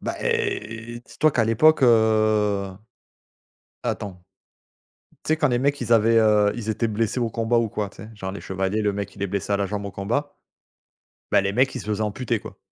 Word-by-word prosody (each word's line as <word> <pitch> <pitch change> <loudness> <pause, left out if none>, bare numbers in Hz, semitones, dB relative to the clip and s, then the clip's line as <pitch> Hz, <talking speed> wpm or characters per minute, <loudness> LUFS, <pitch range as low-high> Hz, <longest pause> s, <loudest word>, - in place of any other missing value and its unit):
Bah, - - -4
eh, 380 - -2
dis - - -17
toi 155 - +4
qu'à 120 -4 +1
l'époque 135 +7 +4
heu 110 -4 +3 1.1
attends. 90 -3 -4 1.0
Tu - - -9
sais - - -6
quand 155 -1 +2
les 120 -1 +1
mecs 140 +1 +1
ils 120 -1 0
avaient, 115 0 +5
heu, 105 -2 +4
ils 115 -2 -6
étaient 110 +1 0
blessés 110 +3 -1
au 115 -2 0
combat 115 +2 0
ou 115 -1 +1
quoi, 105 -1 -3
tu - - -21
sais? 110 - -11
Genre 95 -2 -5
les 100 - -7
chevaliers, 95 +3 -2
le 105 -1 +1
mec 100 -1 -5
il 100 - -8
est 100 - -1
blessé 100 +1 -2
à - - +3
la 100 0 -1
jambe 100 +1 -4
au 100 - -7
combat, 120 +10 -2 1.0
bah, - - +5
les 100 +1 -1
mecs 130 +3 +2
ils - - -3
se - - -9
faisaient 105 0 -2
amputer, 110 +2 -1
quoi. - - -11
110 Hz, 215 wpm, -23 LUFS, 100-120 Hz, 1.1 s, avaient